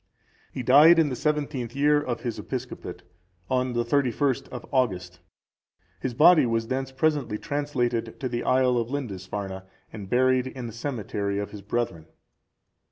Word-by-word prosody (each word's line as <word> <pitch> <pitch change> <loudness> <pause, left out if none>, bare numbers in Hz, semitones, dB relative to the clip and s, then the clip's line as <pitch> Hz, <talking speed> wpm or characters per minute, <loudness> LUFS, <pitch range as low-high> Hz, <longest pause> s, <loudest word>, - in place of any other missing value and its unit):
He 130 - -5
died 150 +7 +7
in 160 -3 +4
the 130 - -3
seventeenth 145 -5 -2
year 145 +1 +3
of 120 -5 -4
his 120 -3 -4
episcopate, 125 -8 -6 0.5
on 130 -1 +1
the 120 0 0
31st 135 +1 +1
of 125 - -8
August.(371) 90 -9 0 0.8
His 130 - -3
body 155 -1 +6
was 115 0 -1
thence 135 0 -2
presently 135 -5 0
translated 120 -5 -2
to 130 - -2
the 120 -1 -3
isle 130 -1 +3
of 115 0 -3
Lindisfarne, 100 -7 -5 0.3
and 100 -3 -8
buried 130 +1 +3
in 130 -1 -7
the 115 - -7
cemetery 105 -5 -3
of 100 0 -4
the 105 - -9
brethren. 100 -6 -3
125 Hz, 155 wpm, -26 LUFS, 115-135 Hz, 0.8 s, died